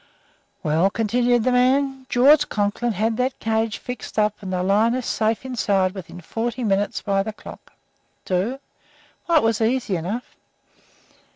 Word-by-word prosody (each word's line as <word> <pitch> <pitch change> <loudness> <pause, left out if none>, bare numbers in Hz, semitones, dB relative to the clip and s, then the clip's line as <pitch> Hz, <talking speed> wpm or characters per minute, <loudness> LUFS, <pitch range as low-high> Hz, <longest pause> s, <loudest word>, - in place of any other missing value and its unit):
"Well," 160 +5 +2
continued 240 +3 +1
the 255 - +2
man, 265 +1 +2
"George 285 +4 +5
Conklin 210 +3 -1
had 220 +3 0
that 255 +1 -1
cage 225 0 -1
fixed 250 -3 -8
up 210 -1 +3
and 190 -2 -6
the 180 -1 -1
lioness 225 +6 +2
safe 220 +2 0
inside 200 -7 +1
within 185 -2 -9
forty 235 +7 -3
minutes 205 -1 0
by 195 -1 +1
the 220 - -4
clock. - - -13 0.5
Do? 190 +8 -1 0.7
Why, 340 -2 +4
it - - +3
was 225 0 +1
easy 230 -3 +1
enough. 200 +9 -5
225 Hz, 150 wpm, -22 LUFS, 200-250 Hz, 0.7 s, George